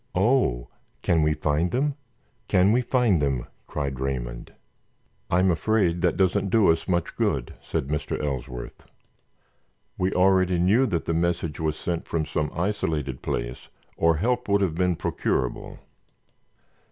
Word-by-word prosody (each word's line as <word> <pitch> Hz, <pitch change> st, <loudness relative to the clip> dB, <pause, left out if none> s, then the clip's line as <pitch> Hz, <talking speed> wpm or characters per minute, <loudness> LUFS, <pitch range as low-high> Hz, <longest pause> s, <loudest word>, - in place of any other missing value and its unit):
"Oh, 95 Hz, -, +2 dB, 0.4 s
can 80 Hz, -2 st, +3 dB
we 75 Hz, 0 st, +2 dB
find 80 Hz, +4 st, 0 dB
them? 140 Hz, +8 st, 0 dB, 0.5 s
Can 95 Hz, +1 st, +4 dB
we 125 Hz, +3 st, +3 dB
find 120 Hz, -, +2 dB
them?" 70 Hz, -4 st, 0 dB, 0.2 s
cried 70 Hz, -3 st, -3 dB
Raymond. -, -, -4 dB, 0.8 s
"I'm 90 Hz, +1 st, +3 dB
afraid 90 Hz, 0 st, +1 dB
that 90 Hz, -, +1 dB
doesn't 95 Hz, +1 st, +2 dB
do 105 Hz, -4 st, +5 dB
us 80 Hz, -, -2 dB
much 85 Hz, -3 st, -1 dB
good," -, -, -1 dB
said 65 Hz, -, -3 dB
Mr. 75 Hz, 0 st, -2 dB
Ellsworth. 65 Hz, -3 st, -5 dB, 1.2 s
"We 95 Hz, +1 st, +1 dB
already 95 Hz, -1 st, +3 dB
knew 105 Hz, +10 st, +3 dB
that 85 Hz, -6 st, -2 dB
the 85 Hz, -, 0 dB
message 85 Hz, -2 st, -1 dB
was 80 Hz, -1 st, -1 dB
sent 85 Hz, +1 st, -3 dB
from 80 Hz, -2 st, -1 dB
some 75 Hz, -1 st, -1 dB
isolated 80 Hz, -8 st, -2 dB
place -, -, -4 dB, 0.3 s
or 85 Hz, -1 st, +3 dB
help 125 Hz, +7 st, 0 dB
would 100 Hz, 0 st, +3 dB
have 95 Hz, -5 st, +1 dB
been 90 Hz, +1 st, +1 dB
procurable. 65 Hz, -5 st, -2 dB
85 Hz, 140 wpm, -25 LUFS, 75-95 Hz, 1.2 s, do